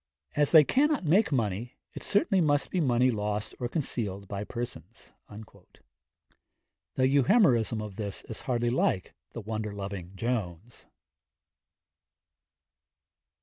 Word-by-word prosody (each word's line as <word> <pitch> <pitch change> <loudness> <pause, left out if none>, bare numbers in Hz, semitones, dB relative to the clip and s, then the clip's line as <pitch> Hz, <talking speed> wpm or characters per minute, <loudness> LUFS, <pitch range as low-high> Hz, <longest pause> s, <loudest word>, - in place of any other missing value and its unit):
As 145 -1 +2
they 155 -2 +9
cannot 290 - +2
make 190 +7 +3
money, 115 -1 -2 0.2
it - - -8
certainly 200 -2 +2
must 145 -3 +1
be 180 - 0
money 125 -2 +3
lost 105 0 -3
or 120 - -2
concealed 105 - -3
by 100 +1 -4
persons.' 120 +2 -8 1.8
The 130 - +3
Euhemerism 130 - +3
of 105 -3 -9
this 100 -3 -5
is 110 - -7
hardly 120 -2 0
like 95 -7 0 0.2
the 115 - -6
wonder 110 0 -4
loving 100 -2 -6
Jones. 110 -2 -4
120 Hz, 115 wpm, -28 LUFS, 105-140 Hz, 1.8 s, they